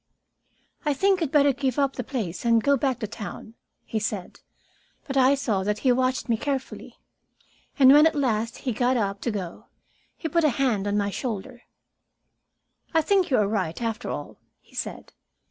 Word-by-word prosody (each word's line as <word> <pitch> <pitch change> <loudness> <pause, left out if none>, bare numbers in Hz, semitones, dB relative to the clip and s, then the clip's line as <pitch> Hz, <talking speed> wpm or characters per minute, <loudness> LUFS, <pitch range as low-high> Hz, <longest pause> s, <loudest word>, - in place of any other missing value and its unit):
"I 295 -3 +1
think 385 +4 +2
you'd 310 -5 -1
better 285 -2 +4
give 260 -1 -2
up 275 -1 +2
the 250 - -3
place 215 -9 -4
and 230 -2 +3
go 280 0 +4
back 265 -1 0
to 215 - -2
town," 220 +1 -8 0.3
he 220 - -2
said. 205 -3 -4 0.7
But 275 - -5
I 265 +1 +5
saw 220 -8 -1
that 210 +1 0
he 255 - +6
watched 255 +1 0
me 230 -2 +1
carefully, 270 +1 -4 0.8
and 270 -1 +8
when, 300 +2 +7
at 320 - -1
last 230 -5 0
he 255 - +1
got 250 +3 +1
up 200 -3 -2
to - - -1
go, 190 -6 -5 0.5
he 325 - -4
put 335 +2 +1
a 305 - +5
hand 230 -8 +1
on 205 0 0
my 200 -1 0
shoulder. 240 +2 -5 1.3
"I 320 - +4
think 385 +2 +2
you 260 - +3
are 210 - +3
right, 190 -6 -2
after 230 0 -3
all," - - -6 0.2
he - - -27
said. - - -6
250 Hz, 185 wpm, -25 LUFS, 215-280 Hz, 1.3 s, and